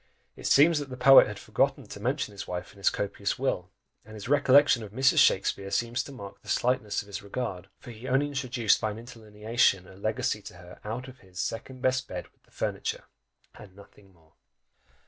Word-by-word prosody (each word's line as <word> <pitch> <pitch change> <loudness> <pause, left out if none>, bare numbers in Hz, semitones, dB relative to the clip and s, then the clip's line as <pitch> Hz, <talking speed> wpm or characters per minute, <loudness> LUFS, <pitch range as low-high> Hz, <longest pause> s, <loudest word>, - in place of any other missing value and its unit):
It - - -5
seems 150 +3 +5
that 145 -2 -6
the 130 - -7
poet 135 +2 +8
had - - -6
forgotten - - 0
to - - -10
mention - - -1
his 100 - -8
wife 90 0 -5
in 100 - -18
his 100 - +3
copious 100 0 -3
will; - - -2 0.3
and 110 +1 -13
his 105 0 -8
recollection 140 -2 +5
of 105 - -7
Mrs. 130 +5 +3
Shakspeare 95 0 +2
seems 120 +4 0
to 140 - -9
mark 100 -7 -10
the - - -13
slightness 115 -5 0
of - - -19
his 100 -1 -7
regard, 100 -3 -5
for 120 - -11
he 115 +3 -10
only 135 +2 +2
introduced 130 -6 +1
by 110 - 0
an 105 - -6
interlineation, 110 -4 -1
a - - -14
legacy 110 +3 -2
to 105 -1 -11
her 90 0 -13
of 125 +4 -6
his 95 -2 -13
"second 130 +5 -5
best 130 0 +1
bed 90 -1 -6
with - - -40
the - - -31
furniture" - - -3 0.5
and 100 -3 -14
nothing 100 0 -18
more! 80 -3 -27
110 Hz, 205 wpm, -28 LUFS, 100-130 Hz, 0.5 s, poet